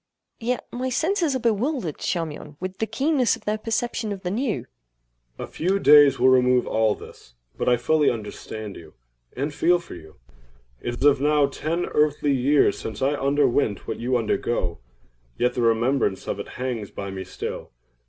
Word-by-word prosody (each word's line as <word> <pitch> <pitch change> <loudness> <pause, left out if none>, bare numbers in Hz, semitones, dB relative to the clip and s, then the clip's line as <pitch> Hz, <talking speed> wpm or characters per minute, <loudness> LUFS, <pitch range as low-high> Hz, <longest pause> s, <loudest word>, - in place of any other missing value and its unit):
Yet 245 +2 -2
my 255 +1 -3
senses 325 +2 +1
are - - 0
bewildered, 230 - -1
Charmion, 155 -4 -4
with 185 +1 -6
the 220 - 0
keenness 275 -3 +1
of - - -17
their 215 +1 -1
perception 225 0 -2
of 195 -2 -6
the 180 - -2
new. 215 - -1
CHARMION. - - -36 0.7
A - - -5
few 185 +4 -1
days 145 -7 +7
will 130 +2 +5
remove 125 -1 +4
all 110 -1 +1
this;—but - - -7
I 125 - +4
fully 150 +5 +2
understand 110 -1 -6
you, 80 -2 -13 0.4
and 145 +3 -2
feel 175 +4 +3
for 175 - -11
you. 80 -3 -12 0.7
It 120 +2 -4
is 145 -2 +5
now 150 0 +4
ten 160 +5 -2
earthly 150 -1 +1
years 135 -3 +3
since 110 +2 -5
I 140 +2 +2
underwent 140 -6 +1
what - - -4
you 125 +1 +1
undergo—yet 65 - -3
the 125 - -2
remembrance 115 -2 +1
of - - -3
it - - -5
hangs 125 -5 -3
by 100 -1 -6
me 95 -1 -5
still. - - -6
140 Hz, 170 wpm, -24 LUFS, 115-185 Hz, 0.7 s, days